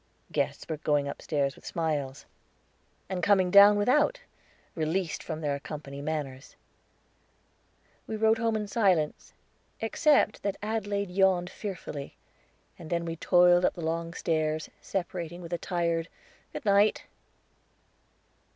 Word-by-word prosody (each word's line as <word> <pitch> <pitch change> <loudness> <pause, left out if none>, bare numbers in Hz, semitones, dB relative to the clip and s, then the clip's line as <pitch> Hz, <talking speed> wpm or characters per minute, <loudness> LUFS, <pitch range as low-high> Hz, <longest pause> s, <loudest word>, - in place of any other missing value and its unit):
Guests - - -2
were 160 - -3
going 145 -1 +1
upstairs 140 -1 -2
with - - -18
smiles, 145 -5 -3 0.8
and 185 -1 -3
coming 185 -1 +3
down 200 +1 +8
without, 295 - +2 0.5
released 165 +2 -1
from 160 -1 -5
their 145 -2 -1
company 140 -1 -7
manners. 145 -3 -5 1.5
We 220 - -3
rode 220 +1 +3
home 225 -1 +1
in 210 -1 -2
silence, 190 -8 +1 0.5
except 225 0 +2
that 200 -1 -2
Adelaide 205 -3 -2
yawned 185 -1 +2
fearfully, 170 -8 -7 0.6
and 160 - -9
then 170 -1 -1
we 165 -1 -3
toiled 175 +1 +5
up - - +2
the 170 - -5
long 165 +1 -2
stairs, 155 -1 -1
separating 175 -2 -4
with 175 -1 -8
a 170 - -1
tired, 170 -2 -1 0.4
"good - - -7
night." 205 +1 +3
175 Hz, 125 wpm, -28 LUFS, 155-200 Hz, 1.5 s, down